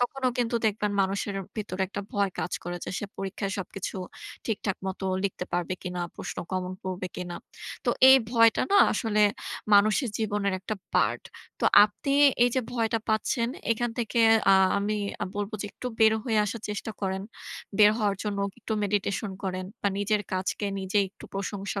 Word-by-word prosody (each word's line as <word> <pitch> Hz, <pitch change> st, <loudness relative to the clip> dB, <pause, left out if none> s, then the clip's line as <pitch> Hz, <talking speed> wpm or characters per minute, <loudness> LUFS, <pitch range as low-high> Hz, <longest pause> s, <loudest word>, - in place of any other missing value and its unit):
তখনও 255 Hz, +1 st, 0 dB
কিন্তু 235 Hz, -1 st, +1 dB
দেখবেন 210 Hz, 0 st, 0 dB
মানুষের 195 Hz, +1 st, -1 dB, 0.2 s
ভেতরে 190 Hz, -3 st, -3 dB
একটা 200 Hz, -, -4 dB
ভয় 200 Hz, -1 st, +1 dB
কাজ -, -, -3 dB
করে 175 Hz, +1 st, -3 dB
যে -, -, -5 dB
সে -, -, -4 dB
পরীক্ষায় 195 Hz, 0 st, -3 dB
সবকিছু 195 Hz, +1 st, -5 dB, 0.5 s
ঠিকঠাক 205 Hz, -3 st, -1 dB
মতো 190 Hz, 0 st, -4 dB, 0.2 s
লিখতে 185 Hz, -2 st, -2 dB
পারবে 175 Hz, +1 st, -1 dB
কিনা, 180 Hz, -1 st, -4 dB, 0.2 s
প্রশ্ন -, -, -6 dB, 0.2 s
common 185 Hz, 0 st, -2 dB
পড়বে 185 Hz, -1 st, -4 dB
কিনা। 175 Hz, -1 st, -5 dB, 0.5 s
তো -, -, +3 dB, 0.2 s
এই 265 Hz, -, +10 dB
ভয়টা 230 Hz, -2 st, +5 dB
না 405 Hz, -, +7 dB
আসলে 215 Hz, -2 st, 0 dB, 0.5 s
মানুষের 215 Hz, +5 st, +4 dB
জীবনের 205 Hz, -2 st, 0 dB
একটা 215 Hz, +2 st, -3 dB, 0.2 s
part. -, -, +2 dB, 0.4 s
তো -, -, 0 dB, 0.2 s
আপনি 275 Hz, +7 st, -3 dB, 0.3 s
এই -, -, +4 dB
যে 260 Hz, -, +2 dB
ভয়টা 225 Hz, -1 st, +1 dB
পাচ্ছেন 230 Hz, +2 st, +1 dB, 0.2 s
এখান 240 Hz, +1 st, -1 dB
থেকে, 235 Hz, 0 st, 0 dB, 0.3 s
আ -, -, +8 dB, 0.2 s
আমি 210 Hz, +1 st, -1 dB, 0.3 s
আ -, -, +2 dB
বলব 205 Hz, 0 st, -2 dB
যে -, -, -3 dB
একটু 250 Hz, -, -7 dB
বের 220 Hz, 0 st, +6 dB
হয়ে 225 Hz, -4 st, +1 dB
আসার 215 Hz, +2 st, -4 dB
চেষ্টা 210 Hz, +1 st, -4 dB
করেন। 190 Hz, -1 st, -2 dB, 0.6 s
বের 210 Hz, -1 st, +8 dB
হওয়ার 205 Hz, -2 st, +1 dB
জন্য 205 Hz, -2 st, -2 dB, 0.2 s
একটু 220 Hz, -, -4 dB
meditation 200 Hz, 0 st, -1 dB
করেন 185 Hz, 0 st, -2 dB, 0.2 s
বা 200 Hz, -, +3 dB
নিজের 205 Hz, +1 st, +1 dB
কাজকে 185 Hz, +2 st, -1 dB
নিজেই 195 Hz, +2 st, +1 dB
একটু -, -, -15 dB
প্রশংসা 200 Hz, 0 st, -3 dB
205 Hz, 170 wpm, -27 LUFS, 190-220 Hz, 0.6 s, এই